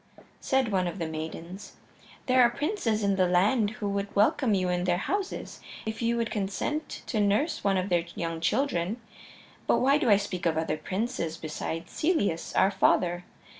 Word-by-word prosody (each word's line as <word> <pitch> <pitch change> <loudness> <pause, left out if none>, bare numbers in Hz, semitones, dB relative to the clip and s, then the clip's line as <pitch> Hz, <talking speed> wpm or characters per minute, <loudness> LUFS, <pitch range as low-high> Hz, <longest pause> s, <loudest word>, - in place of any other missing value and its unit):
Said 265 -4 +1
one 185 -2 +1
of 175 - -4
the 170 - -2
maidens: 160 +4 -7 0.5
"There 255 -1 +4
are 240 - +6
princes 245 - -1
in 200 -1 +2
the 185 -1 +3
land 205 +5 +3
who 210 -1 -4
would 200 0 -3
welcome 215 +2 +3
you 185 -1 0
in 180 0 0
their 175 -1 +2
houses 390 - -3 0.3
if 220 +1 -4
you 235 0 +1
would 230 -1 -1
consent 210 +10 -3
to 220 - -2
nurse 215 +11 +1
one 195 -1 +2
of 185 +2 -1
their 175 -2 +2
young 165 -1 -3
children. 215 -1 0 0.7
But - - +4
why 275 +3 +3
do 265 -7 +1
I 205 - +7
speak 185 -3 -3
of 160 -1 0
other 160 -1 0
princes 185 -1 -3
beside 160 +1 -5
Celeus, 205 - 0
our 195 - +4
father? 180 -2 +2
200 Hz, 180 wpm, -28 LUFS, 175-235 Hz, 0.7 s, I